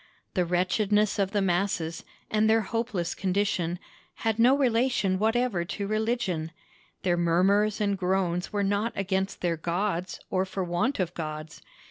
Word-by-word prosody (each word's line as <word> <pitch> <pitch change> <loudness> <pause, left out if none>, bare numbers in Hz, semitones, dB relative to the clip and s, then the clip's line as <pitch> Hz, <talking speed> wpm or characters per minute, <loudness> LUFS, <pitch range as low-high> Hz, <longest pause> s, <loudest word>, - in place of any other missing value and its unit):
The 180 -2 +1
wretchedness 195 +4 +1
of 195 -1 +2
the 200 -1 0
masses, 175 -3 0 0.3
and 215 0 +3
their 225 0 +4
hopeless 220 -5 -2
condition, 185 -3 0 0.5
had 225 0 +1
no 255 +4 +6
relation 235 -7 +2
whatever 225 -3 +1
to 200 +4 -4
religion; 215 -7 -1 0.5
their 175 -2 +2
murmurs 195 +5 +3
and 200 -1 +1
groans 180 -1 0
were 205 -1 0
not 205 +3 0
against 195 0 -1
their 170 -2 0
gods 175 +2 -2
or 185 -1 +2
for 190 0 -3
want 175 +10 0
of 175 -2 -1
gods. 155 -1 -6
195 Hz, 145 wpm, -27 LUFS, 175-215 Hz, 0.5 s, no